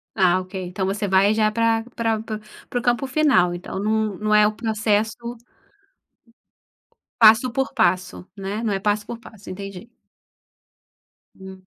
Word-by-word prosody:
Ah, 185 -2 +3
ok. 185 +1 -11
Então 190 +1 -3
você 205 +2 -2
vai 195 +2 +4
já 215 -1 +2
para 225 0 +1
para 225 -2 0
para 215 -1 -6 0.3
para 245 - -2
o 240 - -5
campo 245 +2 +1
final, 260 - +3
então 175 +2 -6
não 215 -1 0
não 215 0 +1
é 210 0 +6
o 215 - 0
processo 220 +1 -1 1.8
passo 225 +3 +6
por 265 +2 -1
passo, 185 -5 0
né. 200 +3 -4
Não 215 -3 0
é 195 - 0
passo 205 +1 0
por 235 - -6
passo, 220 -3 -13
entendi. 195 +3 -8 1.5
Hum. 190 0 -12
215 Hz, 155 wpm, -22 LUFS, 195-225 Hz, 1.8 s, é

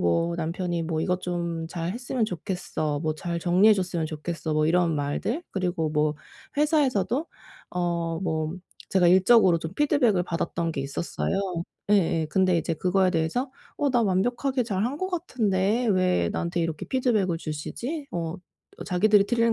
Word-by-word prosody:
뭐 165 - +1
남편이 170 +1 -2
뭐 160 -1 -2
"이것 180 +2 0
좀 170 -2 -3
잘했으면 215 +9 -2
좋겠어." 175 -6 -3
뭐 155 -1 -1
"잘 170 +1 -3
정리해 185 +6 +5
줬으면 175 -4 -1
좋겠어." 160 +1 -4
뭐 155 0 +2
이런 170 -1 +2
말들 145 - -2
그리고 180 -4 -1
뭐 150 0 +1 0.4
회사에서도 285 - +2 0.4
어 170 -2 -1
뭐 160 -2 -1 0.3
제가 185 -2 +3
일적으로 190 0 +6
좀 160 +1 -6
피드백을 275 - +3
받았던 165 -1 -2
게 140 - -3
있었어요. 140 +7 -2 0.5
예예. 165 -5 +3
근데 185 -1 +3
이제 165 +1 -1
그거에 185 +2 +2
대해서 170 - 0 0.3
'어 285 -2 +2
나 245 -2 +3
완벽하게 245 +7 +1
잘한 220 +5 -1
것 375 +2 -2
같은데 230 - 0
왜 185 - +2
나한테 175 0 -2
이렇게 165 -2 -3
피드백을 215 -10 +1
주시지? 235 - -5
어 165 0 -3 0.4
어 - - -6
자기들이 200 +2 +4
틀린 230 0 +2
180 Hz, 330 characters per minute, -26 LUFS, 165-220 Hz, 0.5 s, 일적으로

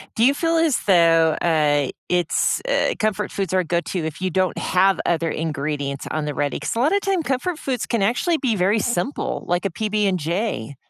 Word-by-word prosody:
do 225 - +3
you 275 - +5
feel 330 +2 0
as 325 -5 +2
though, 165 -3 +4
uh, 150 -4 +2 0.2
it's, 175 -2 +1
uh, - - +1
comfort 210 -1 -1
foods 195 -2 -3
are 185 - +3
a - - +1
go 170 +1 0
to 175 -3 -4
if 160 +1 -5
you 185 -1 -2
don't 185 +1 0
have 190 +1 +2
other 165 -1 0
ingredients 145 -3 -3
on 155 -1 -2
the 150 - -3
ready? 145 0 -2
'Cause - - -3
a 230 - -1
lot 290 +6 +3
of 400 0 +2
time 385 -3 0
comfort 305 +5 -2
foods 255 -4 -2
can 230 -4 -1
actually 245 - +1
be 240 -6 0
very 195 +4 +2
simple, 240 +5 -2
like 175 +2 0
a 195 - 0
PB 210 +2 -1
and 185 -2 0
J. 165 - -3
185 Hz, 220 wpm, -22 LUFS, 160-235 Hz, 0.2 s, you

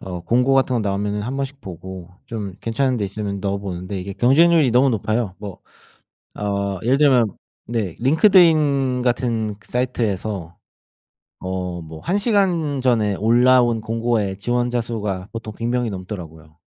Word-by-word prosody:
어 90 -2 -6
공고 125 +9 +2
같은 130 -1 +2
거 115 - +1
나오면은 105 +1 -1
한 130 +5 -4
번씩 140 0 -4
보고 95 -1 -9 0.2
좀 105 -6 -5
괜찮은 125 +3 0
데 105 - -1
있으면 100 0 -4
넣어 100 0 -1
보는데 95 0 -5
이게 100 +2 -6
경쟁률이 150 - +4
너무 130 +2 +4
높아요. 110 -2 -1
뭐 100 -3 -8 0.8
어 100 -1 -1
예를 130 +4 +2
들면 125 -8 +4 0.3
네 110 -7 -2
링크드인 150 - +4
같은 120 -4 -1
사이트에서 105 -8 -2 0.8
어 90 -2 -4
뭐 80 0 -10
1 195 - 0
시간 180 - +1
전에 115 -5 +2
올라온 120 +1 +4
공고에 115 -3 -1
지원자 120 +3 0
수가 105 -5 -4
보통 110 -2 -7
100 115 +2 -4
명이 120 -2 0
넘더라고요. 85 -5 -8
115 Hz, 300 characters per minute, -21 LUFS, 100-125 Hz, 0.8 s, 경쟁률이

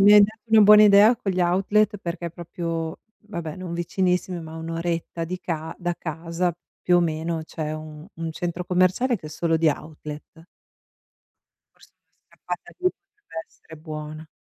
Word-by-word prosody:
mi 205 +1 +8
hai 210 - +10
dato 215 +2 0
una 220 -1 +7
buona 210 +1 +9
idea 210 +3 +7
con 215 -4 -2
gli 185 -1 -1
outlet, 195 +4 +2
perché 170 -1 -4
proprio 165 -1 -4 0.3
vabbè 170 -6 -5
non 185 -2 -6
vicinissimi, 180 +1 0
ma 160 -1 -9
a - - -7
1 165 0 -6
oretta 165 0 -2
di 180 +2 -4
ca 160 -2 -4
da 175 -1 -1
casa 165 +2 -2 0.3
più 180 - +4
o - - +5
meno, 160 0 -1
c'è 155 -1 -4
un 155 0 -8
un 165 0 -4
centro 175 +2 -3
commerciale 185 +8 +2
che 165 - -11
è - - -6
solo 165 +1 0
di 160 0 +3
outlet. 155 +1 -6 1.3
Forse - - -21
una - - -50
scappata - - -7
lì 365 0 +3
potrebbe 390 - -11
essere 160 - -15
buona. 155 0 -7
170 Hz, 175 wpm, -24 LUFS, 160-185 Hz, 1.3 s, hai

